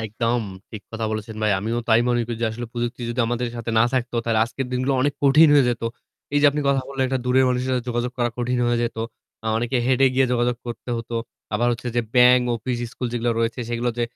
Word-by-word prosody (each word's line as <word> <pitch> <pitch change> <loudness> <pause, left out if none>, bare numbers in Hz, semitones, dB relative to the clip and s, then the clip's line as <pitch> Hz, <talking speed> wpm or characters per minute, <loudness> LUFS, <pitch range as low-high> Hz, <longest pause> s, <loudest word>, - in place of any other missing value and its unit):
একদম 115 +2 -1 0.3
ঠিক 105 -2 -8
কথা 110 0 -3
বলেছেন 110 0 -5
ভাই, 105 - +3
আমিও 115 +4 -2
তাই 110 +1 +5
মনে 120 -1 +2
করি 120 -1 -4
যে - - +3
আসলে 120 +1 -6
প্রযুক্তি 120 +1 -3
যদি 125 +1 -1
আমাদের 120 +1 -1
সাথে 115 0 -4
না 110 - +6
থাকতো 125 -1 -1
তাহলে 115 -2 +1
আজকের 125 +3 -5
দিনগুলো 130 +2 0
অনেক 145 +2 +1
কঠিন 145 +3 +6
হয়ে 140 -3 +6
যেত। 120 - -4 0.5
এই - - +5
যে - - +7
আপনি 150 +1 -2
কথা 135 -1 +3
বললেন 135 -1 -1
একটা 130 -1 -1
দূরের 130 +1 +4
মানুষের 125 +1 -1
সাথে 125 -1 -1
যোগাযোগ 120 +1 -1
করা 120 -1 +1
কঠিন 125 +1 0
হয়ে 120 0 +1
যেত। 120 -1 -3 0.5
অ - - -4
অনেকে 120 +3 -1
হেটে 130 +1 +3
এ - - -3
গিয়ে 130 0 +4
যোগাযোগ 120 0 +1
করতে 120 +1 -6
হতো। 115 0 -6 0.4
আবার 120 - +1
হচ্ছে 120 +1 -4
যে - - +4
ব্যাংক, 125 0 +6
অফিস, 120 +2 -3
স্কুল 125 - -4
যেগুলা 120 0 0
রয়েছে 115 +2 -1
সেগুলাতে 120 0 -1
120 Hz, 235 wpm, -23 LUFS, 115-125 Hz, 0.5 s, যে